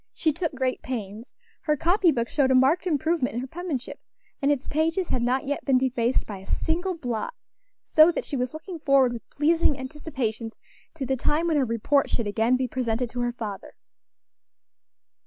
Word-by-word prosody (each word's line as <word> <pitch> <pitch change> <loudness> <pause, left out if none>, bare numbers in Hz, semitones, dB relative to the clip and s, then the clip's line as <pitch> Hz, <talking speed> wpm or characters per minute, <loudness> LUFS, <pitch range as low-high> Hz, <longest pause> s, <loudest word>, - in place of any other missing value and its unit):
She 315 -2 +1
took 325 -2 -3
great 260 -1 -1
pains, 220 -2 -6 0.3
her 300 -1 +1
copy 350 +3 +3
book 235 -4 -1
showed 275 0 +2
a 260 - +4
marked 290 +8 +3
improvement 315 -5 0
in 240 - -1
her - - -4
penmanship, 310 -3 -5 0.4
and 280 +1 +3
its 280 -2 -1
pages 325 +4 0
had 250 - 0
not 255 +4 +1
yet 285 +1 -2
been 270 -2 +3
defaced 255 -1 +1
by 200 -3 -7
a 190 - -13
single 350 +2 -1
blot, 245 - -3 0.5
so 315 +2 +6
that - - -4
she 285 - -4
was 250 -1 -1
looking 330 +2 -8
forward 275 -4 +4
with 230 - -9
pleasing 310 0 +2
anticipations 260 -5 -4 0.4
to 280 -4 -3
the 265 +1 0
time 300 +6 +1
when 325 -3 +2
her 275 - +3
report 230 +5 +1
should 230 - -1
again 225 +4 +2
be 255 0 -1
presented 240 -1 -2
to 245 - -5
her 240 0 0
father. 210 -5 -7
265 Hz, 190 wpm, -26 LUFS, 240-315 Hz, 0.5 s, so